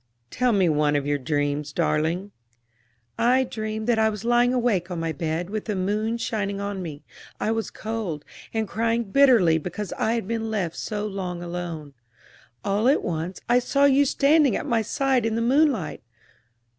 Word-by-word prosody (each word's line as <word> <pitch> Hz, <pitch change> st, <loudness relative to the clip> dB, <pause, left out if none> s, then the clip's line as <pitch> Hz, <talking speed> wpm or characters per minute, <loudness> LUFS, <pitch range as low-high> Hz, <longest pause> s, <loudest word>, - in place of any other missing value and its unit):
"Tell 250 Hz, -1 st, +1 dB
me 195 Hz, -4 st, +3 dB
one 150 Hz, -2 st, +2 dB
of 145 Hz, -1 st, 0 dB
your 145 Hz, 0 st, 0 dB
dreams, 145 Hz, +1 st, -1 dB
darling." 165 Hz, +7 st, 0 dB, 0.9 s
"I 255 Hz, +3 st, +4 dB
dreamed 220 Hz, -2 st, -4 dB
that 235 Hz, -1 st, +2 dB
I 220 Hz, 0 st, +4 dB
was 210 Hz, 0 st, -6 dB
lying 240 Hz, +1 st, +4 dB
awake 230 Hz, -8 st, +1 dB
on 175 Hz, -2 st, -4 dB
my 165 Hz, 0 st, -1 dB
bed, 165 Hz, +4 st, -3 dB
with 215 Hz, -1 st, -3 dB
the 210 Hz, -, -2 dB
moon 210 Hz, +5 st, -1 dB
shining 200 Hz, -4 st, -2 dB
on 200 Hz, -1 st, -3 dB
me; 150 Hz, -4 st, -7 dB, 0.4 s
I 215 Hz, -, 0 dB
was 225 Hz, -1 st, -2 dB
cold, 215 Hz, -9 st, -5 dB, 0.3 s
and 220 Hz, -1 st, -1 dB
crying 230 Hz, +3 st, 0 dB
bitterly 215 Hz, -8 st, +4 dB
because 180 Hz, +5 st, -5 dB
I 220 Hz, -, +1 dB
had 230 Hz, -5 st, -2 dB
been 225 Hz, 0 st, -2 dB
left 185 Hz, -7 st, -2 dB
so 210 Hz, -1 st, -3 dB
long 185 Hz, -4 st, -4 dB
alone. 170 Hz, -4 st, -6 dB, 0.7 s
All 205 Hz, +4 st, +1 dB
at 280 Hz, -, +3 dB
once 170 Hz, +2 st, -3 dB
I 245 Hz, +1 st, +4 dB
saw 275 Hz, +3 st, +2 dB
you 280 Hz, 0 st, +5 dB
standing 280 Hz, -2 st, +3 dB
at -, -, -3 dB
my 230 Hz, -1 st, +1 dB
side 260 Hz, +3 st, +1 dB
in 225 Hz, 0 st, 0 dB
the -, -, 0 dB
moonlight. 250 Hz, -, +2 dB
210 Hz, 180 wpm, -24 LUFS, 170-235 Hz, 0.9 s, you